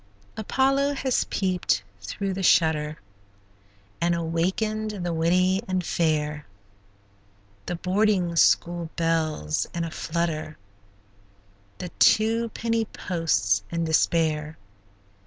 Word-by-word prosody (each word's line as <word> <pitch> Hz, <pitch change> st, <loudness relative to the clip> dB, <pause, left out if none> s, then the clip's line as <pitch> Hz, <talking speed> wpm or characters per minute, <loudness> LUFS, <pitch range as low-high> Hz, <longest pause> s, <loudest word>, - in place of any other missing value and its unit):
Apollo 275 Hz, +5 st, +1 dB
has 260 Hz, -2 st, 0 dB
peeped 180 Hz, -, 0 dB, 0.2 s
through 190 Hz, -, -3 dB
the 190 Hz, -, -4 dB
shutter, 155 Hz, -4 st, +3 dB, 1.0 s
And 170 Hz, 0 st, +2 dB
awakened 190 Hz, +5 st, -2 dB
the 175 Hz, -, -1 dB
witty 180 Hz, +4 st, +2 dB
and 185 Hz, -2 st, -1 dB
fair; 150 Hz, -3 st, -1 dB, 1.2 s
The 175 Hz, -, -2 dB
boarding 185 Hz, -1 st, +1 dB
school 170 Hz, 0 st, +3 dB
belle's 160 Hz, -, 0 dB
in 170 Hz, -, -1 dB
a 165 Hz, -, -4 dB
flutter, 160 Hz, -2 st, -3 dB, 1.2 s
The 180 Hz, -, -6 dB
two 225 Hz, +2 st, +4 dB
penny 230 Hz, 0 st, -1 dB
post's 105 Hz, -, 0 dB
in 170 Hz, 0 st, -2 dB
despair. 160 Hz, -1 st, +1 dB
170 Hz, 100 wpm, -25 LUFS, 160-195 Hz, 1.2 s, two